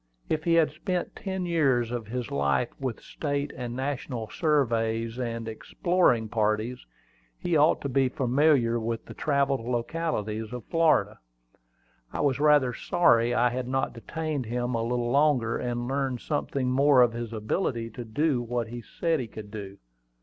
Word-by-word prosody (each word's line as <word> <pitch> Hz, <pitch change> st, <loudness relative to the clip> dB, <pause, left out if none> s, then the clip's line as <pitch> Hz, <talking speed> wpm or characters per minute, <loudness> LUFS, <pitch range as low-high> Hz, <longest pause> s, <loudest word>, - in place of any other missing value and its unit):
If 155 Hz, -1 st, -1 dB
he 170 Hz, -1 st, +4 dB
had 160 Hz, -3 st, +4 dB
spent 180 Hz, +3 st, -3 dB
ten 190 Hz, -2 st, -3 dB
years 135 Hz, -9 st, +2 dB
of 120 Hz, -3 st, -4 dB
his 120 Hz, 0 st, -4 dB
life 70 Hz, -, +1 dB
with 130 Hz, -5 st, -3 dB
state 145 Hz, -1 st, -3 dB
and 120 Hz, -1 st, -5 dB
national 130 Hz, -4 st, -3 dB
surveys 115 Hz, -6 st, 0 dB
and 115 Hz, -2 st, -3 dB
exploring 120 Hz, +1 st, +1 dB
parties, 110 Hz, +2 st, -1 dB, 0.5 s
he 175 Hz, -, -1 dB
ought 150 Hz, +2 st, +4 dB
to -, -, -2 dB
be 135 Hz, 0 st, +2 dB
very 125 Hz, -, -10 dB
familiar 130 Hz, -2 st, +3 dB
with 115 Hz, 0 st, -3 dB
the -, -, -9 dB
travelled 140 Hz, -3 st, +1 dB
localities 120 Hz, -4 st, -2 dB
of 125 Hz, -3 st, -6 dB
Florida. 155 Hz, -11 st, +2 dB, 0.9 s
I -, -, -3 dB
was 140 Hz, -2 st, +1 dB
rather 145 Hz, -4 st, +4 dB
sorry 120 Hz, -7 st, +3 dB
I 120 Hz, +1 st, +4 dB
had 125 Hz, 0 st, -3 dB
not 135 Hz, +1 st, -1 dB
detained 150 Hz, +2 st, -4 dB
him 120 Hz, +2 st, -2 dB
a 115 Hz, -, 0 dB
little 120 Hz, +1 st, -1 dB
longer, 140 Hz, -5 st, +2 dB
and 120 Hz, -1 st, -2 dB
learned 135 Hz, -2 st, -1 dB
something 140 Hz, -4 st, -1 dB
more 135 Hz, -1 st, +5 dB
of 120 Hz, -1 st, +2 dB
his 120 Hz, -1 st, -5 dB
ability 115 Hz, -, -2 dB
to 120 Hz, -, -7 dB
do 130 Hz, +4 st, 0 dB
what 120 Hz, -1 st, -2 dB
he 120 Hz, +1 st, -6 dB
said 165 Hz, +7 st, -1 dB
he 125 Hz, -, -4 dB
could 105 Hz, -1 st, -10 dB
do. 100 Hz, -2 st, -7 dB
125 Hz, 165 wpm, -27 LUFS, 115-145 Hz, 0.9 s, more